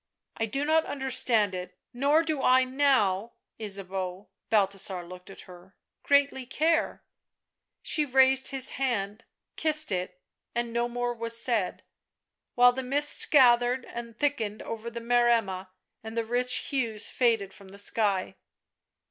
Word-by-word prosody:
" -, -, -61 dB
I 225 Hz, -, -1 dB
do 275 Hz, +6 st, -2 dB
not 320 Hz, +1 st, +2 dB
understand 255 Hz, -7 st, +1 dB
it. 180 Hz, 0 st, -7 dB, 0.2 s
Nor 285 Hz, +6 st, +2 dB
do 310 Hz, -4 st, -2 dB
I 260 Hz, 0 st, +4 dB
now, 255 Hz, -6 st, +1 dB, 0.3 s
Ysabeau," 195 Hz, -2 st, -3 dB
— -, -, -57 dB
Balthasar 195 Hz, -3 st, 0 dB
looked 180 Hz, +1 st, -12 dB
at 195 Hz, -, -11 dB
her 180 Hz, +1 st, -16 dB
— -, -, -61 dB
" -, -, -60 dB
greatly 280 Hz, -3 st, +1 dB
care 320 Hz, +4 st, 0 dB, 0.4 s
" -, -, -60 dB, 0.3 s
She 305 Hz, -, +3 dB
raised 265 Hz, -1 st, +4 dB
his 270 Hz, -1 st, -1 dB
hand, 215 Hz, -4 st, -2 dB, 0.3 s
kissed 310 Hz, -4 st, +2 dB
it, 180 Hz, -1 st, -4 dB, 0.4 s
and 235 Hz, -1 st, -2 dB
no 235 Hz, 0 st, 0 dB
more 245 Hz, 0 st, -2 dB
was 230 Hz, 0 st, 0 dB
said, 230 Hz, -6 st, -1 dB, 0.7 s
while 245 Hz, 0 st, +6 dB
the 260 Hz, +2 st, -4 dB
mists 285 Hz, +3 st, +2 dB
gathered 245 Hz, -2 st, +4 dB
and 235 Hz, -1 st, -9 dB
thickened 230 Hz, -8 st, -2 dB
over 230 Hz, +1 st, -6 dB
the 235 Hz, 0 st, -7 dB
Maremma 230 Hz, -6 st, +1 dB, 0.3 s
and 220 Hz, +1 st, -8 dB
the 230 Hz, -, 0 dB
rich 250 Hz, +2 st, 0 dB, 0.2 s
hues 230 Hz, -6 st, -2 dB
faded 225 Hz, -6 st, 0 dB
from 200 Hz, -, -15 dB
the 195 Hz, +1 st, -13 dB
sky. 200 Hz, -2 st, 0 dB
235 Hz, 155 wpm, -27 LUFS, 200-265 Hz, 0.7 s, while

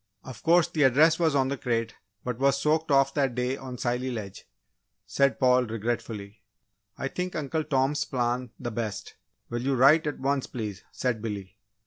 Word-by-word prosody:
"Of 130 Hz, -4 st, -10 dB
course, 170 Hz, 0 st, +4 dB
the 155 Hz, -, -2 dB
address 150 Hz, +5 st, +5 dB
was 160 Hz, -4 st, +2 dB
on 135 Hz, -1 st, +2 dB
the 140 Hz, -, -2 dB
crate 115 Hz, -2 st, -1 dB, 0.3 s
but 125 Hz, -1 st, -4 dB
was 140 Hz, 0 st, +3 dB
soaked 155 Hz, +1 st, +1 dB
off 135 Hz, -1 st, +4 dB
that 135 Hz, -5 st, 0 dB
day 125 Hz, +1 st, 0 dB
on 130 Hz, -2 st, -8 dB
Scilly 125 Hz, +2 st, -1 dB
Ledge," 105 Hz, -6 st, -7 dB, 0.6 s
said 140 Hz, -1 st, +1 dB
Paul, 125 Hz, -1 st, +4 dB
regretfully. 110 Hz, -2 st, -4 dB, 0.6 s
"I 135 Hz, -, -2 dB
think 180 Hz, +5 st, -4 dB
Uncle 155 Hz, 0 st, -2 dB
Tom's 135 Hz, +2 st, +1 dB
plan 125 Hz, -1 st, -1 dB
the 120 Hz, -2 st, -4 dB
best 110 Hz, -3 st, -4 dB, 0.4 s
will 120 Hz, 0 st, -2 dB
you 135 Hz, +2 st, 0 dB
write 150 Hz, +5 st, +5 dB
at 150 Hz, -, -2 dB
once, 135 Hz, 0 st, 0 dB
please?" 105 Hz, -5 st, -6 dB
said 120 Hz, -4 st, -2 dB
Billy. 100 Hz, -4 st, -5 dB
130 Hz, 175 wpm, -27 LUFS, 120-140 Hz, 0.6 s, address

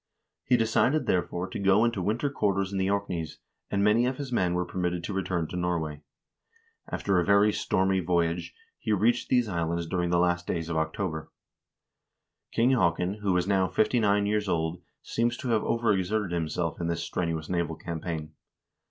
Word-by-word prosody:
He 125 Hz, -, +4 dB
decided, 120 Hz, +6 st, +2 dB
therefore, 90 Hz, 0 st, 0 dB
to -, -, -5 dB
go 100 Hz, +3 st, +4 dB
into 115 Hz, -5 st, 0 dB
winter 115 Hz, +9 st, 0 dB
quarters 100 Hz, -6 st, 0 dB
in 100 Hz, -, -2 dB
the 95 Hz, 0 st, +1 dB
Orkneys, 90 Hz, -6 st, -2 dB, 0.3 s
and 100 Hz, 0 st, +1 dB
many 110 Hz, +4 st, +4 dB
of 130 Hz, 0 st, -2 dB
his 140 Hz, -3 st, -5 dB
men 90 Hz, -7 st, +1 dB
were 90 Hz, 0 st, 0 dB
permitted 90 Hz, -1 st, -2 dB
to 100 Hz, -, -4 dB
return 90 Hz, -3 st, -1 dB
to -, -, -6 dB
Norway. 85 Hz, -4 st, -2 dB, 0.9 s
After 95 Hz, -3 st, +1 dB
a -, -, +2 dB
very 100 Hz, +2 st, +4 dB
stormy 95 Hz, 0 st, +1 dB
voyage, 85 Hz, -1 st, 0 dB, 0.2 s
he 110 Hz, -, 0 dB
reached 120 Hz, +4 st, +2 dB
these 125 Hz, -2 st, +3 dB
islands 85 Hz, -2 st, -1 dB
during 90 Hz, +1 st, -1 dB
the 85 Hz, -, +2 dB
last 90 Hz, 0 st, +1 dB
days 80 Hz, -1 st, -2 dB
of 85 Hz, -, -2 dB
October. 80 Hz, 0 st, -2 dB, 1.2 s
King 120 Hz, +3 st, +3 dB
Haakon, 90 Hz, -3 st, +1 dB
who 100 Hz, -2 st, +1 dB
was 90 Hz, +1 st, +1 dB
now 95 Hz, -2 st, +3 dB
fifty 120 Hz, +5 st, +2 dB
nine 100 Hz, -1 st, +3 dB
years 105 Hz, -1 st, 0 dB
old, 80 Hz, +1 st, -1 dB, 0.2 s
seems 120 Hz, +1 st, 0 dB
to 125 Hz, -, -4 dB
have 110 Hz, -2 st, +3 dB
overexerted 105 Hz, -3 st, 0 dB
himself 85 Hz, 0 st, -2 dB
in 85 Hz, -, -1 dB
this 85 Hz, 0 st, -2 dB
strenuous 80 Hz, -3 st, -2 dB
naval 85 Hz, -3 st, -1 dB
campaign. 80 Hz, -1 st, -5 dB
95 Hz, 180 wpm, -28 LUFS, 85-105 Hz, 1.2 s, He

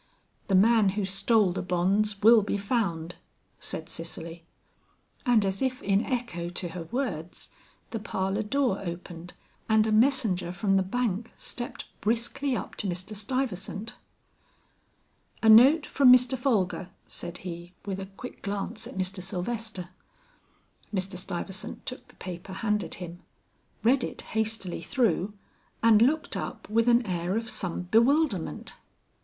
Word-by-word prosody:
"The 195 Hz, -, +2 dB
man 215 Hz, +1 st, +5 dB
who 205 Hz, -, +1 dB
stole 195 Hz, +1 st, +3 dB
the 175 Hz, -, -3 dB
bonds 195 Hz, +3 st, +1 dB
will 225 Hz, 0 st, +8 dB
be 205 Hz, 0 st, -1 dB
found," 195 Hz, -6 st, -1 dB, 0.4 s
said -, -, -4 dB
Cicely. 165 Hz, 0 st, -7 dB, 0.8 s
And 230 Hz, -4 st, +4 dB
as 195 Hz, +3 st, -1 dB
if 260 Hz, -1 st, 0 dB
in 195 Hz, +2 st, +2 dB
echo 235 Hz, -10 st, -3 dB
to 175 Hz, 0 st, -4 dB
her 170 Hz, -1 st, -6 dB
words 185 Hz, -, -3 dB, 0.4 s
the 225 Hz, -, -3 dB
parlor 195 Hz, -1 st, -1 dB
door 240 Hz, -1 st, +1 dB
opened, 175 Hz, -1 st, -7 dB, 0.4 s
and 220 Hz, 0 st, +5 dB
a 220 Hz, -, 0 dB
messenger 215 Hz, -7 st, +3 dB
from 195 Hz, +2 st, +1 dB
the 190 Hz, -, +4 dB
bank 220 Hz, +2 st, -1 dB
stepped 240 Hz, 0 st, -3 dB, 0.2 s
briskly 235 Hz, +5 st, 0 dB
up -, -, -6 dB
to 205 Hz, -, -1 dB
Mr. 185 Hz, +4 st, -3 dB
Stuyvesant. 215 Hz, -2 st, -2 dB, 1.5 s
"A 220 Hz, -, +6 dB
note 270 Hz, +8 st, +8 dB
from 265 Hz, -3 st, +5 dB
Mr. 250 Hz, 0 st, +6 dB
Folger," 205 Hz, -8 st, 0 dB, 0.2 s
said 175 Hz, +1 st, -5 dB
he, 175 Hz, 0 st, -7 dB
with 195 Hz, -1 st, -3 dB
a 190 Hz, -, -5 dB
quick 200 Hz, +6 st, -10 dB
glance 200 Hz, 0 st, -3 dB
at -, -, -9 dB
Mr. 185 Hz, 0 st, 0 dB
Sylvester. 190 Hz, 0 st, -4 dB, 1.0 s
Mr. 190 Hz, -1 st, -2 dB
Stuyvesant 185 Hz, +1 st, -5 dB
took 255 Hz, -, -6 dB
the -, -, -19 dB
paper 185 Hz, +1 st, -7 dB
handed 210 Hz, -4 st, -1 dB
him, 175 Hz, -1 st, -8 dB, 0.6 s
read 255 Hz, +3 st, +4 dB
it -, -, -5 dB
hastily 220 Hz, -4 st, -2 dB
through, 210 Hz, -, 0 dB, 0.5 s
and 225 Hz, -2 st, +6 dB
looked 305 Hz, +6 st, +2 dB
up -, -, -5 dB
with 230 Hz, +2 st, +3 dB
an 240 Hz, 0 st, +4 dB
air 180 Hz, +1 st, -1 dB
of 230 Hz, +1 st, -1 dB
some 180 Hz, -1 st, -2 dB
bewilderment. 230 Hz, -, +2 dB
205 Hz, 140 wpm, -28 LUFS, 185-235 Hz, 1.5 s, will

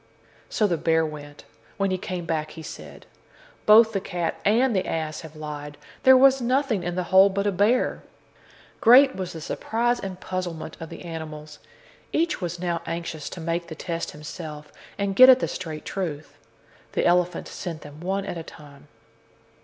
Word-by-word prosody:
So 215 Hz, -, +1 dB
the 175 Hz, -5 st, +1 dB
bear 160 Hz, 0 st, +2 dB
went. 145 Hz, -1 st, -9 dB, 0.3 s
When 195 Hz, -1 st, 0 dB
he 185 Hz, -, 0 dB
came 180 Hz, -2 st, -5 dB
back, 155 Hz, -2 st, -2 dB
he 160 Hz, -, -7 dB
said: -, -, -10 dB, 0.6 s
"Both 220 Hz, +1 st, +7 dB
the 195 Hz, -, -1 dB
cat 175 Hz, -3 st, -3 dB
and 230 Hz, +3 st, +3 dB
the 190 Hz, -, 0 dB
ass 155 Hz, -1 st, -3 dB
have 160 Hz, -1 st, -11 dB
lied; 150 Hz, -1 st, -7 dB, 0.2 s
there 260 Hz, 0 st, +7 dB
was 270 Hz, 0 st, +5 dB
nothing 250 Hz, -3 st, +1 dB
in 175 Hz, 0 st, -3 dB
the 180 Hz, -, -1 dB
hole 190 Hz, +1 st, +8 dB
but 200 Hz, +1 st, -2 dB
a 205 Hz, -, +2 dB
bear." 210 Hz, +7 st, +1 dB, 0.8 s
Great 265 Hz, +4 st, +7 dB
was 185 Hz, -2 st, -5 dB
the 160 Hz, -, -8 dB
surprise 235 Hz, +8 st, -1 dB
and 190 Hz, -2 st, -6 dB
puzzlement 175 Hz, -4 st, -5 dB
of 165 Hz, -, -7 dB
the -, -, -10 dB
animals. 155 Hz, -2 st, -8 dB, 0.5 s
Each 330 Hz, -6 st, 0 dB
was 175 Hz, -1 st, -3 dB
now 170 Hz, -2 st, -2 dB
anxious 165 Hz, -2 st, -4 dB
to -, -, -8 dB
make 170 Hz, +1 st, -2 dB
the 160 Hz, -, -8 dB
test 165 Hz, +1 st, -4 dB
himself 150 Hz, 0 st, -9 dB, 0.2 s
and 200 Hz, -1 st, -1 dB
get 255 Hz, +3 st, +9 dB
at 255 Hz, -, +9 dB
the -, -, -1 dB
straight 160 Hz, -4 st, -6 dB
truth. 160 Hz, -6 st, -5 dB, 0.6 s
The -, -, 0 dB
elephant 180 Hz, 0 st, +2 dB
sent 165 Hz, -4 st, -6 dB
them 145 Hz, +1 st, -12 dB
one 190 Hz, +3 st, -2 dB
at 175 Hz, -, -5 dB
a -, -, -5 dB
time. 150 Hz, -3 st, -14 dB
175 Hz, 180 wpm, -25 LUFS, 160-200 Hz, 0.8 s, get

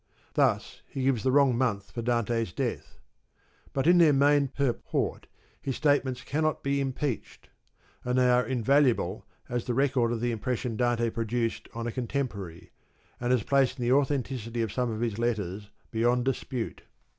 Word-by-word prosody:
Thus -, -, +1 dB
he 135 Hz, -, -4 dB
gives 130 Hz, -4 st, +2 dB
the 130 Hz, -, +1 dB
wrong 135 Hz, -2 st, +4 dB
month 100 Hz, -5 st, -1 dB
for 115 Hz, -, -4 dB
Dante's 115 Hz, -3 st, 0 dB
death. -, -, -4 dB, 0.7 s
But 135 Hz, 0 st, -1 dB
in 175 Hz, +1 st, +6 dB
their 160 Hz, -4 st, +6 dB
main 140 Hz, +1 st, +4 dB
purport 135 Hz, -2 st, -2 dB, 0.3 s
his 135 Hz, -, -3 dB
state 145 Hz, -2 st, +3 dB
ments 130 Hz, -2 st, -5 dB
cannot 155 Hz, +1 st, -1 dB
be 140 Hz, 0 st, +1 dB
impeached, 135 Hz, -2 st, -4 dB, 0.5 s
and 125 Hz, +1 st, 0 dB
they 125 Hz, 0 st, +4 dB
are 125 Hz, 0 st, +4 dB
invaluable 125 Hz, -6 st, +1 dB, 0.2 s
as 120 Hz, -1 st, -2 dB
the 120 Hz, -, -1 dB
record 130 Hz, -3 st, +2 dB
of 120 Hz, -, -1 dB
the 120 Hz, +1 st, 0 dB
impression 120 Hz, +1 st, -2 dB
Dante 120 Hz, -1 st, +1 dB
produced 115 Hz, +1 st, -2 dB
on 115 Hz, 0 st, -4 dB
a 120 Hz, -, -2 dB
contemporary, 115 Hz, -9 st, -4 dB, 0.5 s
and 120 Hz, 0 st, -1 dB
as 125 Hz, -4 st, +2 dB
placing 135 Hz, -2 st, +1 dB
the 120 Hz, -, +2 dB
authenticity 130 Hz, -4 st, 0 dB
of 110 Hz, -, -4 dB
some 125 Hz, -1 st, 0 dB
of 110 Hz, 0 st, -4 dB
his 115 Hz, -2 st, -1 dB
letters 105 Hz, -4 st, -2 dB, 0.2 s
beyond 120 Hz, +2 st, +2 dB
dispute. 130 Hz, -2 st, -3 dB
125 Hz, 165 wpm, -28 LUFS, 115-135 Hz, 0.7 s, in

